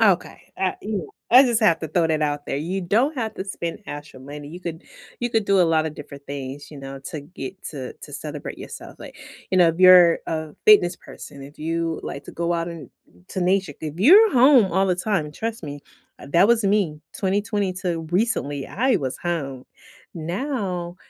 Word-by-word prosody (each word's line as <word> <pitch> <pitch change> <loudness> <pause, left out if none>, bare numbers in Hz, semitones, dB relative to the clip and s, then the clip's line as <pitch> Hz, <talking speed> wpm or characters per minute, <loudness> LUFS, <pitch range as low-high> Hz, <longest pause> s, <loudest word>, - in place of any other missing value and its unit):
Okay. 195 -5 +1
Ah, 190 -1 0
you 210 0 -2
know, - - -7 0.2
I 255 +3 +9
just 240 -3 +1
have 170 -7 +4
to 160 - -4
throw 165 +2 +2
that 155 -1 +1
out 145 -1 -1
there: - - -2
You 175 +7 -2
don't 225 - +1
have 220 -3 -3
to 190 - -5
spend 170 -4 -5
extra 145 -2 -8
money. 145 +2 -9
You 175 +4 -9
could 170 -1 -6 0.4
you 240 0 -1
could 225 -2 +1
do 200 -1 +3
a - - +7
lotta 160 -2 +2
different 145 -1 -11
things, 140 0 -7
you 150 - -10
know, 135 0 -8
to 160 -4 -5
get 150 +3 -9
to 135 -4 -6
to - - -13
celebrate - - -6
yourself. - - -10
Like, - - -11 0.3
you 185 - +2
know, 175 -2 +6
if 165 +1 -2
you're 180 -2 +8
a 160 -1 -3 0.2
fitness 180 -5 +6
person, 140 - -12
if 140 +2 -13
you 165 +1 -2
like 140 - -6
to - - -10
go 170 0 -1
out 170 0 -1
and 165 -2 -9 0.2
n 90 - -22
to 185 - -4
nature 185 -2 +1
if 155 -2 -5
you're 390 - +7
home 250 -5 +6
all 190 +2 +2
the 180 -2 +1
time, 180 -5 -1
trust 225 +8 -5
me, 145 -2 -7 0.4
uh, - - -11
that 180 +5 +5
was 235 -2 +3
me 195 -7 +1 0.2
2020 205 0 0
to 180 -3 -2
recently, 175 - 0
I 255 +4 +1
was 135 -5 -3
home. 140 -7 -3 0.5
Now, 180 - -3
175 Hz, 210 wpm, -23 LUFS, 150-200 Hz, 0.5 s, I